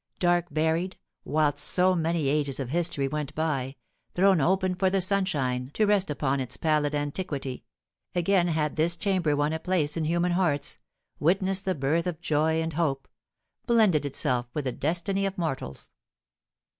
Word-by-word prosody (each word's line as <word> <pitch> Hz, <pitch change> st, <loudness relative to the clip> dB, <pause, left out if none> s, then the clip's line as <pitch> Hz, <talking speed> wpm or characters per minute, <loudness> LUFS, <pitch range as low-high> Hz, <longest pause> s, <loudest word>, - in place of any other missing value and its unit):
Dark 175 Hz, -1 st, +2 dB
buried 160 Hz, +4 st, 0 dB, 0.3 s
whilst 150 Hz, -1 st, +1 dB
so 185 Hz, +4 st, +2 dB
many 165 Hz, -3 st, 0 dB
ages 145 Hz, -1 st, +1 dB
of 130 Hz, -3 st, -3 dB
history 165 Hz, -3 st, 0 dB
went 150 Hz, 0 st, -4 dB
by, 140 Hz, -4 st, -1 dB, 0.4 s
thrown 190 Hz, -2 st, +4 dB
open 185 Hz, +4 st, +2 dB
for 185 Hz, +1 st, +1 dB
the 195 Hz, +1 st, +1 dB
sunshine 150 Hz, -10 st, 0 dB
to 215 Hz, -, +3 dB
rest 205 Hz, -3 st, +2 dB
upon 140 Hz, -2 st, 0 dB
its 130 Hz, -2 st, -3 dB
pallid 150 Hz, -2 st, +1 dB
antiquity, 145 Hz, -3 st, -4 dB, 0.5 s
again 175 Hz, 0 st, +2 dB
had 155 Hz, -2 st, -1 dB
this 165 Hz, +2 st, +2 dB
chamber 175 Hz, -5 st, +1 dB
won 145 Hz, +2 st, 0 dB
a 160 Hz, -, -2 dB
place 160 Hz, -4 st, +1 dB
in 165 Hz, -2 st, -1 dB
human 170 Hz, +2 st, +1 dB
hearts, 160 Hz, -6 st, 0 dB, 0.4 s
witnessed 190 Hz, +4 st, +1 dB
the 185 Hz, -1 st, 0 dB
birth 155 Hz, +5 st, 0 dB
of 165 Hz, -3 st, -3 dB
joy 160 Hz, 0 st, +1 dB
and 160 Hz, 0 st, -4 dB
hope, 140 Hz, -4 st, -1 dB, 0.6 s
blended 215 Hz, -, +4 dB
itself 125 Hz, -3 st, -1 dB
with 150 Hz, -2 st, -2 dB
the 130 Hz, -, 0 dB
destiny 175 Hz, +8 st, -1 dB
of 195 Hz, -, -6 dB
mortals. 135 Hz, -, -4 dB
160 Hz, 160 wpm, -27 LUFS, 145-180 Hz, 0.6 s, thrown